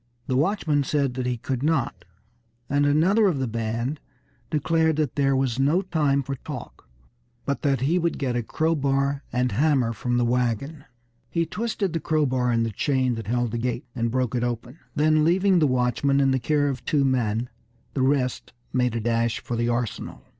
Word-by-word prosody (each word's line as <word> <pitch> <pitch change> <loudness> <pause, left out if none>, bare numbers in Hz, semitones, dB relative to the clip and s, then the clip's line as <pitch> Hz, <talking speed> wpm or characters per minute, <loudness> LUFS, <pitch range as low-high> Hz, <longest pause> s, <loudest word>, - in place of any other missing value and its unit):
The 130 - -1
watchman 150 -1 +1
said 140 -2 0
that 125 0 -3
he 125 -1 -1
could 125 +1 -3
not, 135 - 0 0.6
and 145 +1 +2
another 185 +9 +4
of 175 -7 +1
the 130 -1 -1
band 115 +5 -2 0.5
declared 160 +1 +2
that 150 -4 0
there 135 -1 +2
was 130 -2 0
no 150 +8 +3
time 150 -6 +1
for 140 - -4
talk, - - -9 0.6
but 140 - -2
that 135 -4 +1
he 160 +7 +2
would 170 -1 0
get 130 -4 -1
a 120 - +1
crowbar 140 0 0
and 125 +1 0
hammer 135 -5 +2
from 120 +3 -1
the 120 - +2
wagon. 125 +5 -1 0.4
He 165 +4 0
twisted 205 0 -2
the 165 - 0
crowbar 130 -6 +1
in 115 -1 +2
the 115 - -1
chain 130 +3 +1
that 115 -3 -6
held 120 0 0
the 120 - -2
gate, 120 0 -2
and 115 -1 0
broke 125 0 -1
it 120 -1 0
open; 120 +3 -4 0.2
then 155 +1 +3
leaving 185 +3 +3
the 155 - +4
watchman 130 +2 +1
in 135 -1 +3
the 130 - +1
care 145 +3 +1
of 135 -4 -3
two 145 -3 +2
men, 120 -2 0 0.4
the 135 - -1
rest 130 -1 0 0.2
made 125 -2 +1
a - - 0
dash 115 +1 0
for 120 - -4
the 120 +1 0
arsenal. 120 -2 -3
135 Hz, 190 wpm, -25 LUFS, 120-150 Hz, 0.6 s, another